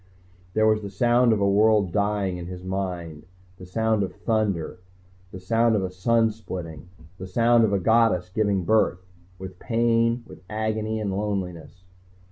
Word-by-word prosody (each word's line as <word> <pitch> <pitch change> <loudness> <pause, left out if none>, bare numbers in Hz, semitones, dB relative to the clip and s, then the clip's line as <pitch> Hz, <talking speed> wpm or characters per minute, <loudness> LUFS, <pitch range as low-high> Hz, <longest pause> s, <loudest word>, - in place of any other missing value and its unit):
There 110 - +3
was 110 0 +3
the 100 - -6
sound 120 +4 +3
of 110 - +2
a 100 - +2
world 105 -1 +3
dying 100 -2 -1
in 85 -1 -7
his 90 0 -8
mind, 90 -4 -5 0.3
the 90 - -11
sound 110 +2 0
of 95 - -3
thunder, 105 -8 -1 0.5
the 95 - -8
sound 115 +4 +2
of 100 - 0
a 95 - -3
sun 115 +4 +2
splitting, 90 -6 -8 0.3
the 95 - -7
sound 115 +4 +3
of 105 - -1
a 100 - +2
goddess 110 -4 +2
giving 100 -3 +1
birth, 90 -4 +1 0.3
with 95 -1 -9
pain 115 0 +1
with - - -14
agony 110 0 -2
in 105 -2 -2
loneliness. 95 -3 -4
100 Hz, 165 wpm, -24 LUFS, 90-110 Hz, 0.5 s, There